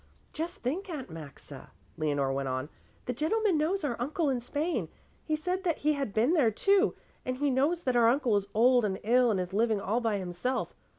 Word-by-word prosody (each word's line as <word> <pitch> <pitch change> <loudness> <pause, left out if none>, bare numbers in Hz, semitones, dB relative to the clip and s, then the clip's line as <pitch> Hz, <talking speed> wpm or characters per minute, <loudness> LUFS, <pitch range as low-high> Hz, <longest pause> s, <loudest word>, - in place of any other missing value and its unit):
"Just 325 -3 -5
think, 350 - -2
Aunt 275 - -6
Maxa," 145 -3 -10 0.3
Leonore 145 -4 0
went 135 0 -2
on, 130 +3 -3 0.4
"the 250 - -2
gentleman 380 - +1
knows 320 +5 0
our 265 -5 -1
uncle 290 +4 0
in 255 - 0
Spain. 265 - -2 0.4
He 310 - 0
said 360 +4 -2
that 340 -4 0
he 300 +1 +1
had 275 -6 -3
been 230 +10 +2
there, 290 -10 +4
too, 395 - +2 0.3
and 255 0 -3
he 285 0 +1
knows 300 +7 +1
that 255 -1 0
our 235 -1 +5
uncle 245 -2 +3
is 200 -1 0
old 245 +2 +5
and 195 -2 -1
ill 245 +3 +4
and 205 -4 +1
is 180 0 -4
living 220 0 +2
all 215 +5 -1
by 225 -3 0
himself. 190 +8 -3
250 Hz, 210 wpm, -29 LUFS, 200-305 Hz, 0.4 s, our